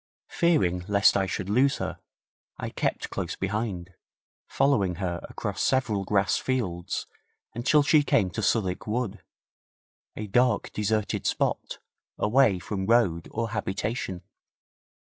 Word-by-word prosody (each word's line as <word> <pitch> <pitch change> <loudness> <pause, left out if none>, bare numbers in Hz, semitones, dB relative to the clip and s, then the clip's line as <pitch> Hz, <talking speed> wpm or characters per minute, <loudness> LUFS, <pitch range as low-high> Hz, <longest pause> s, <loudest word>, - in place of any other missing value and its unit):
Fearing 115 - +2
lest 100 -1 +4
I 95 -1 +1
should 95 +1 -3
lose 130 +7 +3
her - - -4 0.6
I - - -5
kept - - -2
close - - -3
behind, 95 -3 -3 0.5
following 105 -11 +2
her 90 -1 -3
across - - -4
several 110 -7 +1
grass 100 0 +2
fields 95 -10 -2 0.5
until 140 +6 +3
she 150 +1 +5
came 100 -9 +2
to - - -3
Southwick 95 -5 0
Wood, 110 -2 -2 0.9
a 110 - -4
dark, 125 +5 +2
deserted 105 0 -1
spot, - - -1 0.4
away 110 -2 +3
from 95 +1 -4
road 100 -8 +2
or 115 -1 -3
habitation. 100 -3 -3
105 Hz, 125 wpm, -27 LUFS, 95-120 Hz, 0.9 s, she